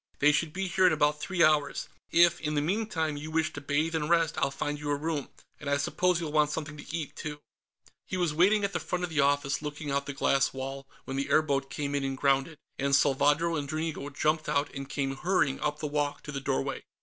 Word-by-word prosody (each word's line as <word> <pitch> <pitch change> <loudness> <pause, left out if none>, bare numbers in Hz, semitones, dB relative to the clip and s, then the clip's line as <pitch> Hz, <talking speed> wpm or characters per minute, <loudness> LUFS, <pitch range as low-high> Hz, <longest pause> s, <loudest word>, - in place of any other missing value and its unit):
They 150 +1 +5
should 155 +1 0
be 190 +3 -2
here 185 +1 +4
in 175 - +4
about 150 -1 +2
three 185 -1 +1
hours. 150 -2 +2 0.2
If, 170 0 +4
in 150 -1 -2
the - - +3
meantime, 160 -4 -1
you 150 +2 -6
wish 160 +1 0
to 145 - -6
bathe 150 +3 0
and 155 -1 -1
rest, 165 -2 +3
I'll 140 - +2
find 145 +2 -3
you 145 0 -4
a 145 - +2
room. 150 -1 -3 0.3
And 145 - -5
I 140 - +3
suppose 180 +5 +1
you'll 160 -3 -4
want 150 -1 +3
something 150 -1 -4
to 150 +2 -6
eat, 155 -4 -6
too...." 150 -2 -6 0.7
He 185 - -3
was 175 -4 +1
waiting 200 +6 +4
at 200 - -1
the - - 0
front 180 0 -3
of 175 - -3
the 155 - 0
office, 140 0 +2
looking 150 -1 -5
out 140 +1 -1
the 140 - -3
glass 135 0 +2
wall, 135 +1 -6 0.2
when 135 - -4
the 140 - -2
airboat 140 -3 +2
came 145 -1 -3
in 140 -1 0
and 135 -1 -2
grounded, 140 +3 +1 0.2
and 140 0 +3
Salvadro 145 +4 +3
and 145 -2 -3
Dranigo 155 -2 -3
jumped 155 +2 0
out 140 +1 0
and 135 -1 -6
came 135 -1 -2
hurrying 145 -5 +1
up 150 0 -1
the 150 - -5
walk 145 -1 -1
to 150 - -6
the 135 -1 -4
doorway. 70 - -2
150 Hz, 240 wpm, -29 LUFS, 140-160 Hz, 0.7 s, They